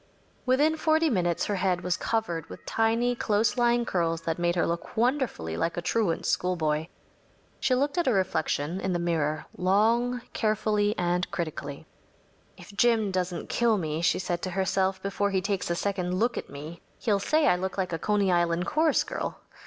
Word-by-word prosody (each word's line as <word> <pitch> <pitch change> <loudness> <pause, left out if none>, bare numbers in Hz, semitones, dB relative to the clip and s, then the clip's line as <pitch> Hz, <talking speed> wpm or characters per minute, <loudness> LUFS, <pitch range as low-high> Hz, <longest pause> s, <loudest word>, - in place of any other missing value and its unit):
Within 295 +5 +3
forty 315 0 +2
minutes 175 -5 +1
her 205 - -1
head 185 -1 +1
was 180 0 0
covered 175 -8 -2
with - - -11
tiny, 230 +2 +1
close 215 -1 +1
lying 240 -1 +2
curls 165 -4 0
that 165 +1 -2
made 175 0 +1
her 175 - +2
look 170 +6 -4
wonderfully 235 - 0
like 165 - -1
a - - -1
truant 205 -6 0
schoolboy. 160 -3 0 0.7
She 255 - +2
looked 285 +5 0
at 345 - 0
her 255 - +4
reflection 170 -3 0
in 190 - -1
the - - +1
mirror 155 -3 -1
long, 230 +6 +2
carefully, 215 -1 +1
and 175 +1 0
critically. 150 -4 -5 0.7
“If 205 - -13
Jim 225 -2 +3
doesn’t 180 -2 -2
kill 235 -2 +2
me,‚ÄĚ 160 -2 -2
she - - +3
said 175 -1 -2
to 185 - -3
herself, 190 +1 0
“before 200 +1 0
he 195 -1 +1
takes 195 -1 -2
a 170 - +1
second 180 -1 -1
look 235 +5 +1
at - - -5
me, 155 +4 -9 0.2
he’ll 205 -3 +1
say 305 +9 +2
I 180 - +5
look 190 +2 -4
like 185 -3 -1
a 165 - -2
Coney 205 -1 +1
Island 175 0 +1
chorus 310 +6 +2
girl. - - -4
190 Hz, 185 wpm, -27 LUFS, 170-225 Hz, 0.7 s, I